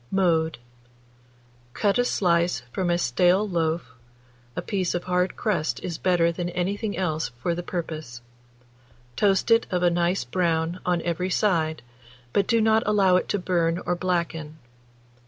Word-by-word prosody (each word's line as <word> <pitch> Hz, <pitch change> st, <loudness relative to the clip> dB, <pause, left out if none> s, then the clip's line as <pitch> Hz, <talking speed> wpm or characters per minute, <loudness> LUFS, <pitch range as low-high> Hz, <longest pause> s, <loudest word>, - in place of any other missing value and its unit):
Mode. 165 Hz, -4 st, +1 dB, 1.2 s
Cut 205 Hz, +3 st, +1 dB
a -, -, +4 dB
slice 170 Hz, -, +1 dB
from 180 Hz, +4 st, -1 dB
a 175 Hz, -, +2 dB
stale 180 Hz, +8 st, +2 dB
loaf 165 Hz, -5 st, -1 dB, 0.6 s
(a -, -, -2 dB
piece 190 Hz, -5 st, -1 dB
of 175 Hz, -, -2 dB
hard 180 Hz, 0 st, 0 dB
crust 155 Hz, -, -1 dB
is 170 Hz, -3 st, -4 dB
better 175 Hz, -2 st, +2 dB
than 175 Hz, +1 st, -3 dB
anything 200 Hz, +4 st, -2 dB
else 160 Hz, -6 st, -1 dB
for 170 Hz, +7 st, -1 dB
the 175 Hz, -, -3 dB
purpose), 155 Hz, -9 st, -6 dB, 0.9 s
toast 200 Hz, -, +2 dB
it 230 Hz, 0 st, +4 dB
of 180 Hz, -1 st, 0 dB
a 175 Hz, -, +4 dB
nice 175 Hz, +2 st, +1 dB
brown 170 Hz, -1 st, -1 dB
on 175 Hz, -2 st, +1 dB
every 175 Hz, +2 st, -1 dB
side, 160 Hz, -, +1 dB, 0.5 s
but 200 Hz, -, +2 dB
do 230 Hz, -, +3 dB
not 220 Hz, 0 st, +4 dB
allow 195 Hz, -3 st, +4 dB
it 180 Hz, -, 0 dB
to 205 Hz, -, +1 dB
burn 175 Hz, -3 st, 0 dB
or 175 Hz, -, +1 dB
blacken. 170 Hz, -4 st, -2 dB
175 Hz, 155 wpm, -25 LUFS, 165-190 Hz, 1.2 s, a